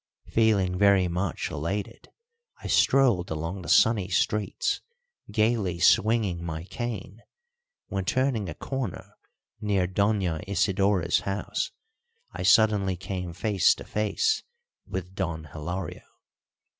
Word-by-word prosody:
Feeling 100 Hz, -5 st, +2 dB
very 100 Hz, -2 st, +5 dB
much 90 Hz, 0 st, -2 dB
elated, 100 Hz, +9 st, -4 dB, 0.5 s
I -, -, -15 dB
strolled 125 Hz, -10 st, +3 dB
along 80 Hz, +5 st, -4 dB
the -, -, -8 dB
sunny 110 Hz, -5 st, +4 dB
streets, 100 Hz, +2 st, 0 dB, 0.5 s
gaily 110 Hz, -5 st, +1 dB
swinging 100 Hz, -1 st, +3 dB
my 80 Hz, -1 st, -4 dB
cane, 110 Hz, 0 st, -6 dB, 0.7 s
when, 95 Hz, -2 st, -2 dB
turning 125 Hz, -5 st, 0 dB
a 75 Hz, -, -6 dB
corner 130 Hz, -8 st, -5 dB, 0.5 s
near 100 Hz, -3 st, +1 dB
Doña 95 Hz, -4 st, 0 dB
Isidora's 95 Hz, -2 st, +2 dB
house, 100 Hz, +1 st, -3 dB, 0.6 s
I -, -, -7 dB
suddenly 105 Hz, -4 st, +4 dB
came 90 Hz, -1 st, -5 dB
face 95 Hz, +2 st, +2 dB
to -, -, -9 dB
face 430 Hz, -, 0 dB, 0.5 s
with 95 Hz, 0 st, -5 dB
Don 85 Hz, -5 st, -3 dB
Hilario. 80 Hz, +4 st, -6 dB
95 Hz, 110 wpm, -27 LUFS, 90-105 Hz, 0.7 s, very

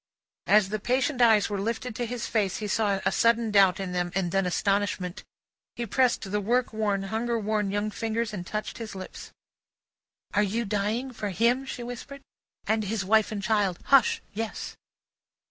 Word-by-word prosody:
As 205 Hz, -2 st, +5 dB
the 215 Hz, +1 st, -2 dB
patient 255 Hz, +4 st, 0 dB
eyes 220 Hz, -4 st, +5 dB
were 200 Hz, -2 st, -3 dB
lifted 230 Hz, +2 st, -3 dB
to 240 Hz, 0 st, -2 dB
his 245 Hz, 0 st, -4 dB
face, 205 Hz, -5 st, 0 dB
he 215 Hz, -, -4 dB
saw 205 Hz, -1 st, +1 dB
a -, -, +3 dB
sudden 230 Hz, -1 st, +2 dB
doubt 195 Hz, -3 st, +5 dB
in 190 Hz, -2 st, -3 dB
them, 175 Hz, -1 st, -1 dB
and 185 Hz, -3 st, 0 dB
then 195 Hz, 0 st, +1 dB
astonishment. 195 Hz, -1 st, -1 dB, 0.5 s
He 235 Hz, -, -3 dB
pressed 250 Hz, +3 st, +2 dB
the 210 Hz, 0 st, 0 dB
work 240 Hz, +3 st, +1 dB
worn, 205 Hz, -3 st, 0 dB
hunger 225 Hz, +4 st, -1 dB
worn 210 Hz, -1 st, 0 dB
young 205 Hz, +2 st, -1 dB
fingers, 225 Hz, 0 st, -2 dB
and 185 Hz, -4 st, -4 dB
touched 210 Hz, +6 st, -5 dB
his 220 Hz, -3 st, -6 dB
lips. 185 Hz, -1 st, -8 dB, 1.0 s
"Are 205 Hz, -, +3 dB
you 215 Hz, +3 st, 0 dB
dying 215 Hz, +6 st, -1 dB
for 215 Hz, -3 st, -4 dB
him?" 240 Hz, +7 st, +1 dB
she 245 Hz, -, -5 dB
whispered. 245 Hz, +3 st, -8 dB, 0.4 s
"And 220 Hz, -1 st, +1 dB
his 200 Hz, -1 st, -2 dB
wife 220 Hz, +2 st, +3 dB
and 205 Hz, -2 st, -4 dB
child. 200 Hz, -3 st, +1 dB, 0.2 s
Hush! 265 Hz, -5 st, +5 dB
Yes." 220 Hz, +1 st, -4 dB
215 Hz, 180 wpm, -27 LUFS, 200-230 Hz, 1.0 s, As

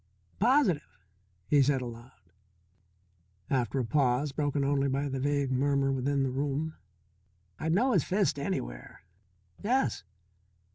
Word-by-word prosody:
"Positive," 230 Hz, -, +2 dB, 0.5 s
he 145 Hz, -1 st, +4 dB
said, 135 Hz, 0 st, +3 dB
aloud, 115 Hz, -7 st, -11 dB, 1.2 s
after 125 Hz, -2 st, 0 dB
a 130 Hz, -, 0 dB
pause 135 Hz, +2 st, +1 dB
broken 145 Hz, -1 st, -1 dB
only 140 Hz, 0 st, +1 dB
by 140 Hz, +2 st, -1 dB
the 135 Hz, -1 st, -3 dB
vague 140 Hz, 0 st, 0 dB
murmur 135 Hz, +1 st, +2 dB
within 135 Hz, +1 st, 0 dB
the 130 Hz, -, -1 dB
room. 145 Hz, +4 st, -2 dB, 0.9 s
"I'd 160 Hz, +1 st, 0 dB
know 250 Hz, +8 st, +3 dB
his 180 Hz, -, +3 dB
fist 190 Hz, -6 st, 0 dB
anywhere. -, -, -5 dB, 0.6 s
Yes." 250 Hz, -, +1 dB
140 Hz, 125 wpm, -29 LUFS, 130-150 Hz, 1.2 s, he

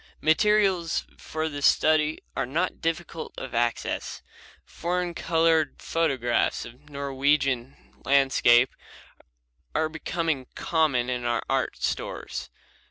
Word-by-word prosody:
Materials 190 Hz, 0 st, +3 dB
for 160 Hz, 0 st, -3 dB
this 145 Hz, -2 st, +1 dB
study 155 Hz, 0 st, +3 dB, 0.2 s
are 135 Hz, -, -1 dB
not 165 Hz, +8 st, -1 dB
difficult 165 Hz, 0 st, -3 dB
of 130 Hz, -2 st, -6 dB
access. 120 Hz, 0 st, -1 dB, 0.4 s
Foreign 175 Hz, 0 st, -2 dB
colored 165 Hz, -2 st, +2 dB
photographs 135 Hz, -8 st, 0 dB
of 125 Hz, +6 st, -14 dB
Norwegian 140 Hz, -2 st, 0 dB, 0.3 s
landscape 130 Hz, -3 st, +4 dB, 1.0 s
are 160 Hz, 0 st, +1 dB
becoming 160 Hz, -4 st, -2 dB
common 150 Hz, -7 st, +1 dB
in 125 Hz, -1 st, -2 dB
our 120 Hz, -1 st, 0 dB
art 135 Hz, -2 st, 0 dB
stores. -, -, -3 dB
150 Hz, 100 wpm, -26 LUFS, 130-165 Hz, 1.0 s, landscape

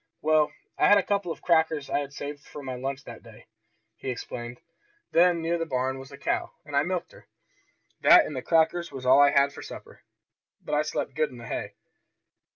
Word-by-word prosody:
"Well, 155 Hz, -1 st, +3 dB, 0.3 s
I -, -, +5 dB
had 205 Hz, -, +7 dB
a 200 Hz, -, +2 dB
couple 200 Hz, -3 st, -1 dB
of -, -, -8 dB
crackers 160 Hz, -4 st, +2 dB
I -, -, 0 dB
had 140 Hz, -1 st, -5 dB
saved 145 Hz, +1 st, -7 dB
from 145 Hz, -2 st, -10 dB
my 130 Hz, -, -4 dB
lunch 135 Hz, +2 st, -4 dB
that 115 Hz, -, -10 dB
day," 115 Hz, -3 st, -15 dB, 0.5 s
he -, -, -5 dB
explained. 120 Hz, -1 st, -6 dB, 0.5 s
"Then 170 Hz, 0 st, +4 dB
near 170 Hz, +1 st, 0 dB
the 165 Hz, -, -1 dB
barn 130 Hz, -1 st, -1 dB
was 135 Hz, +1 st, -11 dB
a 140 Hz, -, -10 dB
cow, -, -, -2 dB
and 145 Hz, -1 st, -6 dB
I 140 Hz, -, +5 dB
milked 180 Hz, +3 st, -3 dB
her. -, -, -17 dB, 0.7 s
That -, -, +8 dB
and 150 Hz, -, -6 dB
the 130 Hz, -, -3 dB
crackers 170 Hz, +3 st, +2 dB
was 130 Hz, -1 st, -8 dB
all 130 Hz, +2 st, +6 dB
I 145 Hz, -, +7 dB
had 140 Hz, 0 st, +3 dB
for -, -, -9 dB
supper. -, -, -11 dB, 0.6 s
But -, -, -7 dB
I 150 Hz, -, +3 dB
slept 150 Hz, -2 st, -3 dB
good 155 Hz, +1 st, 0 dB
in 125 Hz, -, -12 dB
the 120 Hz, -, -10 dB
hay." -, -, -5 dB
145 Hz, 215 wpm, -27 LUFS, 130-160 Hz, 0.7 s, That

